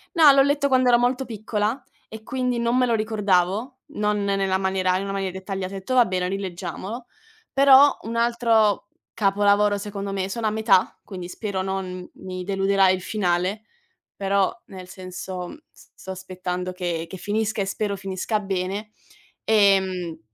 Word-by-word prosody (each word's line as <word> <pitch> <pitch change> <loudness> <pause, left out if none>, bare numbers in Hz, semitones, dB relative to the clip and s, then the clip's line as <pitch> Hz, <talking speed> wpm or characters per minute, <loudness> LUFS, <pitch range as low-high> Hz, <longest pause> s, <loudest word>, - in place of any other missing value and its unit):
no, 310 -4 +8
l'ho 275 0 +5
letto 285 0 +2
quando 255 -2 +3
ero 240 0 +5
molto 250 +2 +1
piccola 220 +2 -2 0.3
e 220 0 -9
quindi 250 -1 -1
non 235 +1 +1
me 255 - +4
lo 235 - +1
ricordavo, 215 +2 0
non 210 -1 0
nella 195 -1 +1
maniera 190 -1 +1
in 195 - -3
una 195 0 -4
maniera 195 -2 -2
dettagliata. 190 0 -5
Ho - - -4
detto: 195 +7 -4
"Va 245 - +6
bene, 185 -2 -1
rileggiamolo". 195 +4 -5 0.5
Però 275 +1 +7
un 230 +1 -5
altro 230 -4 +2 0.3
capolavoro 205 0 +3
secondo 200 -1 -5
me, 190 -1 -2
sono 225 +2 -2
a - - +1
metà, 215 -3 +2
quindi 180 -3 -8
spero 195 -1 -3
non 185 -1 -4
mi 185 -1 -7
deluderà 195 0 +2
il 185 0 +2
finale, 185 +1 -1 0.5
però 195 -1 +1 0.2
nel 185 -2 -10
senso, 185 0 -7
mhmm, - - -10
s - - -20
sto 190 - -8
aspettando 185 -1 -5
che 175 -2 -3
che 190 - -7
finisca 215 +2 -1
e - - 0
spero 200 +1 -2
finisca 195 +3 -2
bene. 195 +1 -3 0.5
Ehm, 190 -5 +2
200 Hz, 165 wpm, -23 LUFS, 185-220 Hz, 0.5 s, no